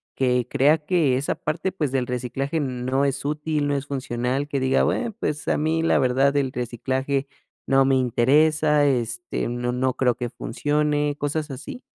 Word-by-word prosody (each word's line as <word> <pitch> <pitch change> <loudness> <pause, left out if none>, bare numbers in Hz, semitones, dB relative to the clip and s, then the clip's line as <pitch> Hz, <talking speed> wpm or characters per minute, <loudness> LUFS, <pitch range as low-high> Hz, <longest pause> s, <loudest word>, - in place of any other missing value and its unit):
que 125 -2 +1
crea 145 +3 +4
que 155 -7 +2
esa 140 - -1
parte, 165 +5 -2
pues, 150 -8 -2
del 130 -2 0
reciclaje 135 +5 -2
no 130 +1 -1
es 140 0 -1
útil, 150 0 -1
no 145 - 0
es 140 0 -3
funcional? 130 0 -2
Que 140 -2 -2
diga: 130 0 +2
"Bueno, 235 -2 0
pues, 150 -7 -2
a - - +2
mí, 160 +2 0
la - - +3
verdad, 135 +3 +2
el 135 -2 0
reciclaje 130 +3 -2 0.4
no 135 0 +4
me 135 0 +3
interesa, 145 +5 +3
este, 120 -3 -1
no 120 0 -2
no 130 0 0
creo 125 -3 +2
que 120 - -4
funcione", 145 +5 -1
¿cosas 145 0 -2
así? 140 - -8
135 Hz, 175 wpm, -23 LUFS, 125-150 Hz, 0.4 s, crea